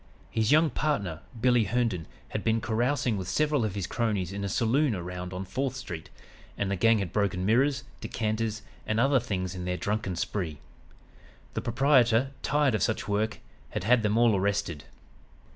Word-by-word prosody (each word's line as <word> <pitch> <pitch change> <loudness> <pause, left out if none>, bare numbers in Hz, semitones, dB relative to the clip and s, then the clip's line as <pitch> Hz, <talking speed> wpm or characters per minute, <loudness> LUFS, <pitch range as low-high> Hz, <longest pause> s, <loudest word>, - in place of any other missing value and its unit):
His 110 +1 +1
young 155 +1 +5
partner, 100 - -1 0.2
'Billy' 120 -1 +4
Herndon, 110 -6 0 0.2
had - - -3
been 115 0 +2
carousing 120 +1 0
with 95 -2 -4
several 150 -1 +1
of 105 -3 -2
his 100 -3 -2
cronies 100 -5 -1
in 100 0 -4
a 100 - -2
saloon 120 +4 +2
around 90 0 -5
on 95 +1 -4
Fourth 130 +6 -2
Street, 85 -11 -7 0.5
and 100 -1 -1
the - - +1
gang 115 +4 +4
had 100 -4 -3
broken 100 -3 0
mirrors, 130 +5 +3 0.2
decanters 110 -1 -2 0.2
and 110 +1 +1
other 135 +2 +4
things 95 -6 -3
in 90 -1 -5
their 90 0 -1
drunken 100 -2 -2
spree. 85 -3 -3 1.0
The - - -2
proprietor, 125 0 +3
tired 145 -3 +2
of 110 - 0
such 110 - 0
work, 105 +2 -1 0.3
had - - -4
had 120 +3 +4
them 105 0 +1
all 120 -2 +5
arrested. 95 -6 -1
110 Hz, 175 wpm, -28 LUFS, 95-125 Hz, 1.0 s, young